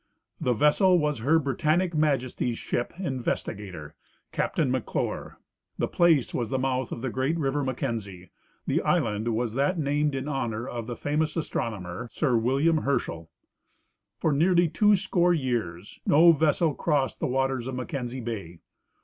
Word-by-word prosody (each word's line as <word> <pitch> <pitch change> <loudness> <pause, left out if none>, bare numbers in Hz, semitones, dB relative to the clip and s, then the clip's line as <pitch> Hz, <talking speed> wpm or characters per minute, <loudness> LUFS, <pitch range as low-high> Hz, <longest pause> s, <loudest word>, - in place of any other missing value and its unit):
"The 125 - +1
vessel 180 - +4
was 150 -5 0
Her 145 +8 +3
Britannic 155 +5 +1
Majesty's 130 -6 0
ship 120 - -2
Investigator, 105 - -4 0.4
Captain - - 0
McClure; - - -3 0.4
the - - 0
place 165 -7 +3
was 120 -3 -2
the 130 - 0
mouth 130 -1 -1
of 120 - -5
the 130 - -2
great 135 +7 0
river 145 -1 0
Mackenzie; 105 -8 -4 0.3
the - - +1
island 115 -10 0
was 115 -1 -1
that 140 +8 +1
named 145 -1 0
in 135 +1 -3
honor 120 -5 -2
of 115 -2 -5
the 120 - -4
famous 155 +2 -1
astronomer, 105 - -3
Sir 130 -1 0
William 135 +8 +2
Herschel. 100 - -2 0.9
"For 160 - +1
nearly 175 +4 +4
two 210 +6 +4
score 180 -2 +2
years 110 - -3
no 165 +4 +7
vessel 155 0 +2
crossed 145 -5 0
the - - 0
waters 135 -1 0
of 130 - -4
Mackenzie 130 -2 -4
bay. 100 -8 -5
135 Hz, 150 wpm, -27 LUFS, 120-155 Hz, 0.9 s, no